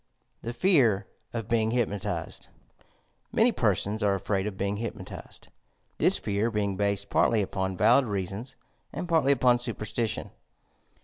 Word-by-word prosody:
THE 115 Hz, -, -4 dB
FE.VB 120 Hz, -, +3 dB, 0.3 s
OF 115 Hz, -3 st, -4 dB
BEING 115 Hz, -1 st, +1 dB
HTPNOTIZED 110 Hz, -5 st, -2 dB, 0.9 s
Ulany -, -, +4 dB
persona 105 Hz, +2 st, +1 dB
are 100 Hz, -1 st, +3 dB
afraid 95 Hz, +1 st, -1 dB
of 100 Hz, -2 st, -5 dB
being 100 Hz, +1 st, -1 dB
hypnotized, 115 Hz, +2 st, -8 dB, 0.3 s
— -, -, -43 dB
^thia -, -, +4 dB
fear 105 Hz, +2 st, 0 dB
being 105 Hz, -3 st, -1 dB
based 100 Hz, 0 st, 0 dB
partly 110 Hz, -3 st, +3 dB
upon 95 Hz, -1 st, -3 dB
valid 120 Hz, +7 st, +5 dB
reasons 100 Hz, +5 st, -4 dB, 0.4 s
and 180 Hz, -, -5 dB
partly 160 Hz, -5 st, +3 dB
upon 125 Hz, -2 st, +4 dB
superstition. 115 Hz, -2 st, -3 dB
105 Hz, 135 wpm, -27 LUFS, 100-120 Hz, 0.9 s, valid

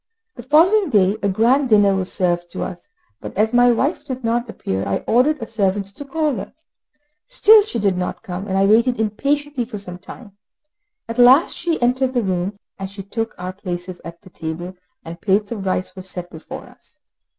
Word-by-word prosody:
The -, -, -10 dB
following 335 Hz, -, +4 dB
day 200 Hz, -4 st, +3 dB
a 200 Hz, -, +1 dB
grand 245 Hz, +7 st, +2 dB
dinner 205 Hz, -3 st, +5 dB
was 185 Hz, -1 st, -2 dB
served 175 Hz, -1 st, -1 dB
to -, -, -3 dB
us 175 Hz, -3 st, -8 dB, 0.3 s
but -, -, -9 dB
as 220 Hz, +3 st, +2 dB
my 245 Hz, 0 st, +5 dB
wife 275 Hz, +8 st, 0 dB
did 260 Hz, -1 st, -6 dB
not 235 Hz, +1 st, 0 dB
appear, 95 Hz, -, -3 dB
I 100 Hz, -1 st, -2 dB
ordered 260 Hz, +7 st, +3 dB
a 225 Hz, -, -5 dB
servant 200 Hz, -2 st, -1 dB
to -, -, -7 dB
call 300 Hz, +1 st, -1 dB
her. 200 Hz, +6 st, -8 dB, 0.7 s
Still 445 Hz, -3 st, +6 dB
she 405 Hz, -, -4 dB
did 200 Hz, -4 st, +1 dB
not 180 Hz, -, -4 dB
come, 185 Hz, +2 st, -6 dB
and 190 Hz, -1 st, -1 dB
I 195 Hz, -, +4 dB
waited 230 Hz, +4 st, +3 dB
impatiently 280 Hz, +5 st, -1 dB
for 225 Hz, -2 st, -7 dB
some 180 Hz, -3 st, -8 dB
time. 205 Hz, +1 st, -12 dB, 0.7 s
At 230 Hz, +2 st, -5 dB
last 255 Hz, +7 st, +6 dB
she 335 Hz, -2 st, -1 dB
entered 255 Hz, +1 st, +1 dB
the 240 Hz, -, +2 dB
room, 190 Hz, +1 st, -2 dB, 0.2 s
and 195 Hz, 0 st, -5 dB
she 195 Hz, 0 st, -9 dB
took 225 Hz, +3 st, -4 dB
our 180 Hz, +1 st, -5 dB
places 180 Hz, -1 st, -6 dB
at 170 Hz, 0 st, -10 dB
the 185 Hz, -, -15 dB
table, 165 Hz, +3 st, -6 dB, 0.3 s
and 170 Hz, +1 st, -9 dB
plates 205 Hz, +1 st, +1 dB
of 200 Hz, -4 st, -4 dB
rice 185 Hz, +1 st, -1 dB
were 190 Hz, -, -7 dB
set 180 Hz, -1 st, -6 dB
before 160 Hz, -, -9 dB
us. -, -, -21 dB
210 Hz, 200 wpm, -20 LUFS, 185-250 Hz, 0.7 s, Still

